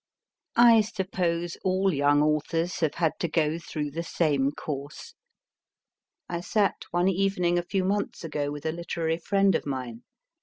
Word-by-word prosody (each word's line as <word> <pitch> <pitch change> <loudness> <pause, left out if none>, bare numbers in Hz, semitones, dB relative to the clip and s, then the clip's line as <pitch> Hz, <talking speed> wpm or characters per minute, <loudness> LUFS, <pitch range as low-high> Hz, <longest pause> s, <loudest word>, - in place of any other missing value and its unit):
I 235 -2 +7
suppose 185 -5 -2
all 190 0 +2
young 145 +1 +3
authors 165 +3 0
have 160 -3 0
had 165 -2 +2
to 170 - 0
go 160 0 0
through 150 -3 -4
the 165 +4 -3
same 150 -5 +1
course. 145 - -7 1.1
I 170 - -3
sat 200 +3 0
one 175 +1 +1
evening, 180 -2 +1
a - - -3
few 190 +1 -1
months 200 0 -2
ago, 150 -3 -2
with 145 0 -7
a 160 - +1
literary 165 -1 -2
friend 195 +3 +2
of - - -1
mine. 125 -4 -4
170 Hz, 155 wpm, -27 LUFS, 150-185 Hz, 1.1 s, I